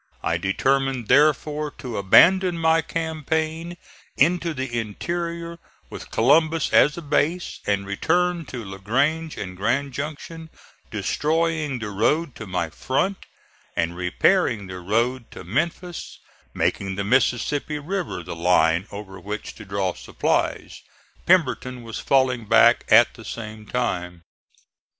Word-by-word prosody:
I 85 Hz, -, +1 dB
determined, 130 Hz, +6 st, 0 dB
therefore, 150 Hz, +2 st, +3 dB
to 125 Hz, -3 st, -6 dB
abandon 180 Hz, -, +5 dB
my 160 Hz, 0 st, +3 dB
campaign 160 Hz, +1 st, -3 dB, 0.4 s
into 170 Hz, -1 st, +2 dB
the 130 Hz, -3 st, -2 dB
interior 170 Hz, -, -4 dB, 0.3 s
with -, -, -9 dB
Columbus 155 Hz, +6 st, +3 dB
as 150 Hz, +3 st, +5 dB
a 170 Hz, -, -6 dB
base, 155 Hz, +4 st, 0 dB
and 100 Hz, -1 st, 0 dB
returned 170 Hz, -, 0 dB
to 120 Hz, -4 st, -7 dB
La 95 Hz, 0 st, -8 dB
Grange 145 Hz, +10 st, 0 dB
and 90 Hz, -2 st, -6 dB
Grand 125 Hz, +8 st, -1 dB
Junction 155 Hz, +3 st, -6 dB, 0.4 s
destroying 160 Hz, -2 st, 0 dB
the 105 Hz, -3 st, -5 dB
road 140 Hz, +9 st, +1 dB
to 110 Hz, -, -8 dB
my 90 Hz, -3 st, -2 dB
front 185 Hz, -, -2 dB, 0.5 s
and 85 Hz, +1 st, -1 dB
repairing 105 Hz, -, +1 dB
the 95 Hz, -1 st, -7 dB
road 115 Hz, +6 st, -1 dB
to -, -, -10 dB
Memphis, 170 Hz, -, -3 dB, 0.3 s
making 95 Hz, -1 st, -1 dB
the 100 Hz, -, -2 dB
Mississippi 130 Hz, +6 st, +1 dB
river 150 Hz, -, -4 dB
the -, -, -7 dB
line 85 Hz, +1 st, +2 dB
over 100 Hz, -1 st, -8 dB
which 105 Hz, +4 st, -6 dB
to 105 Hz, -, -12 dB
draw 95 Hz, -2 st, -1 dB
supplies. -, -, -2 dB, 0.5 s
Pemberton 125 Hz, -8 st, +2 dB
was 115 Hz, -1 st, -6 dB
falling 130 Hz, -4 st, +2 dB
back 115 Hz, +1 st, +5 dB
at 115 Hz, +2 st, +6 dB
the 115 Hz, -, -13 dB
same 110 Hz, -1 st, -8 dB
time. 90 Hz, -8 st, -3 dB
130 Hz, 130 wpm, -23 LUFS, 105-160 Hz, 0.5 s, at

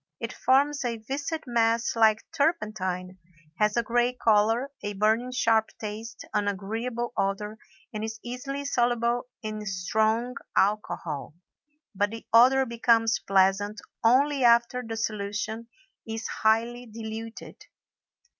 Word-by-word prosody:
It -, -, -4 dB
forms 280 Hz, +2 st, +2 dB
a 235 Hz, -2 st, -2 dB
viscid 280 Hz, +8 st, -4 dB
mass 230 Hz, -1 st, +1 dB
like 220 Hz, -1 st, +4 dB
turpentine, 190 Hz, -, -1 dB, 0.4 s
has 210 Hz, +1 st, +2 dB
a 235 Hz, -, +3 dB
gray 240 Hz, +2 st, +1 dB
color, 225 Hz, +3 st, +2 dB
a 205 Hz, -, -4 dB
burning 220 Hz, +5 st, +1 dB
sharp 225 Hz, -3 st, +2 dB
taste, 220 Hz, +1 st, -7 dB
an 205 Hz, -1 st, +1 dB
agreeable 225 Hz, +5 st, -3 dB
odor, 210 Hz, +2 st, -2 dB, 0.3 s
and 215 Hz, 0 st, -4 dB
is 220 Hz, 0 st, -5 dB
easily 275 Hz, +3 st, -5 dB
soluble 240 Hz, -1 st, +1 dB, 0.2 s
in 215 Hz, -1 st, -4 dB
strong 220 Hz, +6 st, 0 dB, 0.2 s
alcohol; 175 Hz, -8 st, -1 dB, 0.6 s
but 205 Hz, +1 st, +1 dB
the 225 Hz, +1 st, -8 dB
odor 260 Hz, +3 st, +6 dB
becomes 230 Hz, -1 st, +2 dB
pleasant 195 Hz, +2 st, +2 dB, 0.2 s
only 270 Hz, +4 st, +4 dB
after 235 Hz, +1 st, +4 dB
the 225 Hz, -2 st, -6 dB
solution 215 Hz, +1 st, -3 dB, 0.4 s
is 225 Hz, 0 st, -4 dB
highly 235 Hz, +3 st, +1 dB
diluted. 225 Hz, 0 st, -8 dB
225 Hz, 120 wpm, -27 LUFS, 210-240 Hz, 0.6 s, odor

